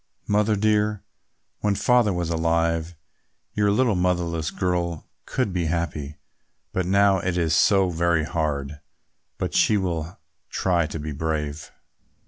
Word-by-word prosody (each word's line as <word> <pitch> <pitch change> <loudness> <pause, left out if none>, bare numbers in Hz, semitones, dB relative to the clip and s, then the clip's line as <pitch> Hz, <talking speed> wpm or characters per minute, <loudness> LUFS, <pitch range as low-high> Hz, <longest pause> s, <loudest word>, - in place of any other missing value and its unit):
"Mother 105 +1 +2
dear, 105 0 +1 0.6
when 105 -1 +1
Father 120 +1 +3
was 85 -2 -2
alive, 85 0 0 0.6
your 105 -1 +2
little 115 +2 +3
motherless 85 -3 0
girl 85 -3 -2 0.2
could 125 -8 -1
be 90 -2 0
happy; 80 -3 -3 0.6
but 95 -1 -1
now 100 0 +4
it 90 0 -2
is 80 -2 +2
so 95 +1 +4
very 85 -1 +1
hard; 75 -3 -2 0.6
but - - -3
she 105 - +4
will 85 -3 -3 0.3
try 85 -4 +1
to 80 - -6
be 75 0 -5
brave." 75 0 -3
85 Hz, 130 wpm, -24 LUFS, 80-100 Hz, 0.6 s, now